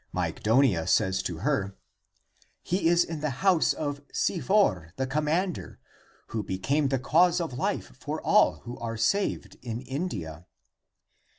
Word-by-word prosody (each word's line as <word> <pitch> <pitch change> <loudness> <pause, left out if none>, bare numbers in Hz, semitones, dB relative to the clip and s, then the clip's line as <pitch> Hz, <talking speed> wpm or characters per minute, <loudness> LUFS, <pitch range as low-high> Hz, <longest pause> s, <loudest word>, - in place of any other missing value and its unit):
Myg - - -3
donia 110 - +3
says 95 0 +2
to 90 -3 -4
her, 100 -10 0 0.4
" - - -47 0.3
He 180 -1 0
is 170 +1 +5
in 165 -2 -5
the 150 0 -1 0.2
house 180 -4 +4
of 145 -1 -3
Sifor 130 - +1
the 130 - -1
commander, 155 +6 -1 0.5
who 110 - -2
became 135 +11 0
the 135 0 +1
cause 170 +7 +3
of 165 -6 -3
life 125 - -3
for - - -4
all - - +3
who 120 +1 -8
are 115 -1 -4
saved 195 - 0
in 120 -1 -5
India." 95 - -5
135 Hz, 150 wpm, -27 LUFS, 105-165 Hz, 0.5 s, is